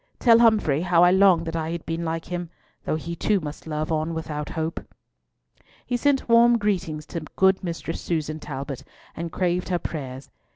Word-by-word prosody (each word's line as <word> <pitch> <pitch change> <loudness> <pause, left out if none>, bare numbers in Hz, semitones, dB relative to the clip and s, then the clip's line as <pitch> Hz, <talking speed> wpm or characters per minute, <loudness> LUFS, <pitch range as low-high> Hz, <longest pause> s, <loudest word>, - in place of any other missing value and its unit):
Tell 230 -2 +6
Humfrey 215 -11 +4
how 175 -1 +4
I 175 - +6
long 190 -3 +5
that 165 0 -4
I 160 -1 -2
had 170 -1 -5
been 165 +1 -3
like 165 0 -3
him, 175 -1 -4 0.4
though - - 0
he 170 +2 -5
too 205 +3 +1
must 150 -1 -8
love 155 +1 -3
on 160 +1 -1
without 150 -2 -4
hope." 160 +1 -2 1.1
He 245 - -1
sent 270 +2 +1
warm 235 0 +6
greetings 180 -8 -2
to 170 - -5 0.2
good 190 0 +3
Mistress 165 -1 -4
Susan 155 -2 -2
Talbot 140 -2 -6 0.3
and 170 0 -5
craved 180 +1 -1
her 180 - +1
prayers. 135 -5 -6
170 Hz, 180 wpm, -24 LUFS, 155-190 Hz, 1.1 s, Tell